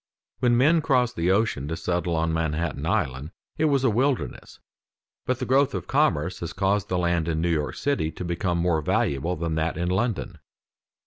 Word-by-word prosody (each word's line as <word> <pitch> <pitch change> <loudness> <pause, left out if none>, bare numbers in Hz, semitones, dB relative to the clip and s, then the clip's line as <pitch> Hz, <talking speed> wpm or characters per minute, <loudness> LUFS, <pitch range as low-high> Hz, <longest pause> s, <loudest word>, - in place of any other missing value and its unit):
When 120 -1 +3
men 155 +6 +4
crossed 125 -5 +1
the 85 0 0
ocean 95 -8 +1
to 80 +1 -3
settle 90 -1 -1
on 80 0 0
Manhattan 80 -1 -2
Island, 65 +3 -1 0.3
it 155 - +3
was 140 -3 +2
a 130 - +4
wilderness; 130 +4 -1 0.7
but 130 - +1
the - - -3
growth 135 +1 +2
of - - -4
commerce 90 - +1
has 85 -1 -5
caused 100 +2 0
the 90 - 0
land 85 -2 0
in 80 -1 -1
New 85 +1 +1
York 75 -3 -1
city 140 - 0
to 90 - -6
become 85 +1 -1
more 85 -2 +1
valuable 75 +3 0
than 85 -1 -3
that 80 0 -1
in 85 +1 -1
London. 105 +2 -1
90 Hz, 190 wpm, -25 LUFS, 80-120 Hz, 0.7 s, men